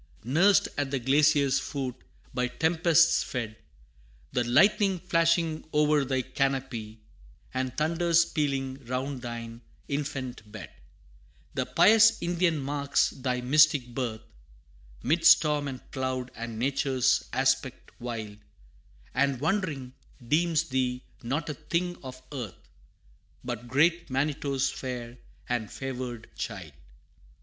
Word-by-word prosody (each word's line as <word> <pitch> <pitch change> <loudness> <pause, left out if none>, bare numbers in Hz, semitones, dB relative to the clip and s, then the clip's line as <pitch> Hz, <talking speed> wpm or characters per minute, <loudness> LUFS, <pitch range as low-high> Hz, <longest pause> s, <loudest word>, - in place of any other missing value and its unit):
Nursed 175 - +4
at 145 -1 -1
the 135 - -1
glacier's 140 +1 +3
foot 135 -3 -4 0.4
by 125 0 0
tempests 165 +4 +3
fed 115 -4 -4 0.8
The 125 - +1
lightning 195 - +4
flashing 165 -2 +1
o'er 150 -1 +4
thy 130 -1 0
canopy, 130 -5 -2 0.5
And 130 0 -3
thunders 170 +2 +3
pealing 135 -3 -2
round 130 +1 -3
thine 115 -1 -7 0.3
infant 135 -6 -4
bed 110 -1 -9 0.8
The - - -2
pious 225 +1 +6
Indian 175 -1 +1
marks 140 0 0
thy 125 -1 -2
mystic 140 -1 +4
birth, 115 -4 -3 0.8
'Mid 160 +7 +1
storm 150 -3 +5
and 130 -2 -8
cloud, 130 -2 -3
and 115 -1 -6
nature's 130 0 +1
aspect 135 -1 0
wild 110 -4 -5 0.7
And 140 -1 +1
wondering, 150 -6 -1 0.3
deems 165 +2 +2
thee 130 -1 -1 0.2
not 140 +6 -2
a 150 - -2
thing 170 +4 -2
of 130 -1 -9
earth, 125 -9 -7 0.7
But 120 -1 -5
great 160 +7 +2
Manitto's 135 0 0
fair 125 -2 -6 0.3
and 115 -4 -2
favored 125 -3 -5
child. - - -6
135 Hz, 115 wpm, -28 LUFS, 125-155 Hz, 0.8 s, pious